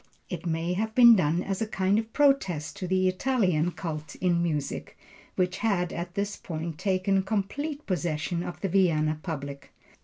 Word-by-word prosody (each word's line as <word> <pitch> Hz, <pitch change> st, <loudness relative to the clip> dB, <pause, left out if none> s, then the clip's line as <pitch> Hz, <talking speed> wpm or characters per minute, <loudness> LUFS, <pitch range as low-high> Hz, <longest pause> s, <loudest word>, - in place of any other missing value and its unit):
It 175 Hz, -1 st, -4 dB
may 165 Hz, +2 st, -1 dB
have 220 Hz, +3 st, -2 dB
been 235 Hz, -2 st, +9 dB
done 170 Hz, -1 st, +1 dB
as 195 Hz, +1 st, -3 dB
a 220 Hz, -, 0 dB
kind 195 Hz, 0 st, +1 dB
of 225 Hz, 0 st, -5 dB
protest 210 Hz, -, +2 dB
to 185 Hz, -3 st, -4 dB
the 185 Hz, +1 st, +2 dB
Italian 185 Hz, -5 st, +1 dB
cult 155 Hz, -4 st, -5 dB
in 175 Hz, -2 st, +1 dB
music, 150 Hz, -5 st, -3 dB, 0.4 s
which 180 Hz, 0 st, 0 dB
had 180 Hz, -6 st, 0 dB
at 175 Hz, +1 st, -5 dB
this 205 Hz, +1 st, -1 dB
period 160 Hz, -2 st, -5 dB
taken 190 Hz, 0 st, +1 dB
complete 265 Hz, +10 st, -3 dB
possession 170 Hz, -1 st, -1 dB
of 175 Hz, -, -6 dB
the 195 Hz, -, 0 dB
Vienna 155 Hz, -5 st, +2 dB
public. 140 Hz, -4 st, -6 dB
185 Hz, 165 wpm, -27 LUFS, 165-200 Hz, 0.4 s, been